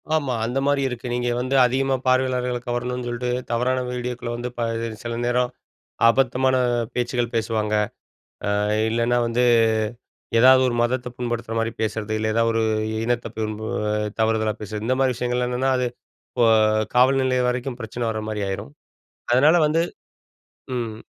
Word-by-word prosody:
ஆமா 140 -5 0
அந்த 125 +4 -1
மாரி 145 -1 +2
இருக்கு, 125 -1 -5
நீங்க 120 0 0
வந்து 130 +2 -1
அதிகமா 135 +2 +1
பார்வையாளர்கள 130 -1 +1
கவரணுன்னு 125 +1 -2
சொல்லிட்டு 120 +1 -3 0.2
தவறான 125 +2 +1
வீடியோக்குள 125 -1 -4
வந்து 120 +1 -4
ப - - -6 0.4
சில 120 -1 -3
நேரம், 125 0 +1 0.6
அபத்தமான 130 +1 +2 0.4
பேச்சுக்கள் 120 -1 -1
பேசுவாங்க. 110 -1 -1 0.8
ஆ - - +1 0.3
இல்லைன்னா 120 +2 +1
வந்து 120 +1 +1 1.0
ஏதாவது 130 +2 +7
ஒரு 120 - -1
மதத்த 125 +1 0
புண்படுத்துற 120 -2 -3
மாதிரி 115 0 -1
பேசுறது, 110 -1 -2
இல்ல 110 0 -1
ஏதா 115 +1 +3
ஒரு 115 0 +1 0.4
இனத்த 120 0 -1
புண்ப 110 -1 -3 0.6
தவறுதலா 110 -1 +1
பேசுறது, 105 +1 -5
இந்த 130 - +2
மாரி 130 -1 +3
விஷயங்கள் 125 +1 -1
என்னென்னா 125 +2 0
அது 125 0 0 0.4
இப்போ 120 -2 +2 0.5
காவல்நிலையம் 130 0 +3
வரைக்கும் 125 0 -3
பிரச்சனை 115 +1 -5
வர 110 - -3
மாதிரி 105 -1 -3
ஆயிரும், 95 -7 -5 0.6
அதனால 145 +7 +5
வந்து 160 +2 +2 0.9
ம் 115 -3 -3
125 Hz, 140 wpm, -23 LUFS, 115-130 Hz, 1.0 s, ஏதாவது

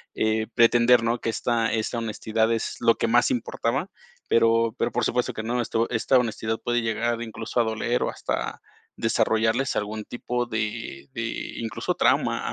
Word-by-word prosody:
eh, 110 0 +1
pretender, 120 +1 +5
¿no? 115 +1 0
Que - - -1
esta 115 0 0
esta 115 +1 -1
honestidad 110 0 0
es 115 -1 -2
lo 115 -1 +4
que - - -1
más 120 +2 +4
importaba, 125 +7 -2 0.4
pero 115 0 +3
pero - - 0
por 125 0 0
supuesto 125 0 0
que 110 - -4
no, 120 +2 -1
esto 115 0 0
esta 125 +3 +3
honestidad 110 -2 -1
puede 120 0 +1
llegar 115 +1 -1
incluso 115 +1 -4
a - - +5
doler 110 +2 -1
o - - +1
hasta - - -3 0.4
desarrollarles 110 +4 +1
algún 105 +1 -3
tipo 120 0 -3
de 105 - -4
de, - - -3 0.3
incluso 115 -1 -3
trauma - - +2
115 Hz, 170 wpm, -25 LUFS, 110-120 Hz, 0.4 s, pretender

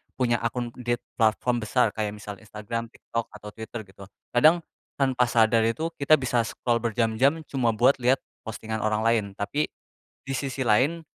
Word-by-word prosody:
punya 120 -2 +2
akun 120 +1 -2
di 120 0 0
t 120 - -18 0.2
platform 115 +2 +2
besar, 110 0 +2
kayak 105 -1 -3
misal 105 -1 -8
Instagram, 110 +2 -5
TikTok 115 0 -5
atau 105 0 -9
Twitter 110 +1 -7
gitu. 95 0 -14 0.2
Kadang, 155 +7 +5 0.3
tanpa 130 -3 +2
sadar 115 -1 +4
itu, 160 +8 -1
kita 150 +2 +6
bisa 125 -4 0
scroll 120 -1 -1
berjam-jam, 120 +7 +1
cuma 120 -5 +1
buat 125 +4 +4
lihat 125 +2 +2 0.2
postingan 110 0 -4
orang 110 0 0
lain. 115 -2 +3
Tapi 145 +10 -1 0.6
di 135 - -3
sisi 135 -1 -2
lain, 145 +10 +2
120 Hz, 165 wpm, -26 LUFS, 110-130 Hz, 0.6 s, kita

